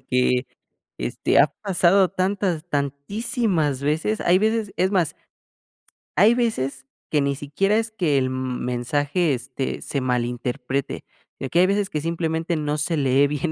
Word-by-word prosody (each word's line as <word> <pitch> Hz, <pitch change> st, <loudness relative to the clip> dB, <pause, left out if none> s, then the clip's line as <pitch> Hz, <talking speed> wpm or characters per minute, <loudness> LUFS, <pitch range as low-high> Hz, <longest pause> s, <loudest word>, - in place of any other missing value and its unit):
porque, 125 Hz, 0 st, +1 dB, 0.5 s
este, -, -, +1 dB
ha -, -, +7 dB, 0.2 s
pasado 190 Hz, -1 st, +4 dB
tantas 185 Hz, -3 st, -1 dB
tantísimas 150 Hz, -, -1 dB
veces 155 Hz, +9 st, 0 dB
hay 180 Hz, +1 st, +4 dB
veces 220 Hz, 0 st, 0 dB
es 185 Hz, +3 st, +2 dB
más, 180 Hz, -7 st, +1 dB, 1.0 s
hay 210 Hz, +5 st, +6 dB
veces 135 Hz, -, -1 dB, 0.3 s
que 150 Hz, -, +3 dB
ni 140 Hz, 0 st, 0 dB
siquiera 145 Hz, +9 st, 0 dB
es 225 Hz, 0 st, -1 dB
que 170 Hz, -10 st, +1 dB
el 130 Hz, -, +2 dB
m 130 Hz, -1 st, -3 dB
mensaje, 145 Hz, +7 st, 0 dB
este, 130 Hz, +2 st, -4 dB
se 140 Hz, -, -2 dB
malinterprete, 125 Hz, +1 st, -2 dB, 0.4 s
eh, 135 Hz, -, -4 dB
que 170 Hz, -, +2 dB
hay 185 Hz, -, +6 dB
veces 200 Hz, 0 st, 0 dB
que 150 Hz, -, -2 dB
simplemente 165 Hz, +1 st, -1 dB
no 150 Hz, -1 st, -1 dB
se 155 Hz, +3 st, 0 dB
lee 140 Hz, -1 st, +3 dB
bien 150 Hz, +2 st, -2 dB
155 Hz, 150 wpm, -23 LUFS, 135-190 Hz, 1.0 s, ha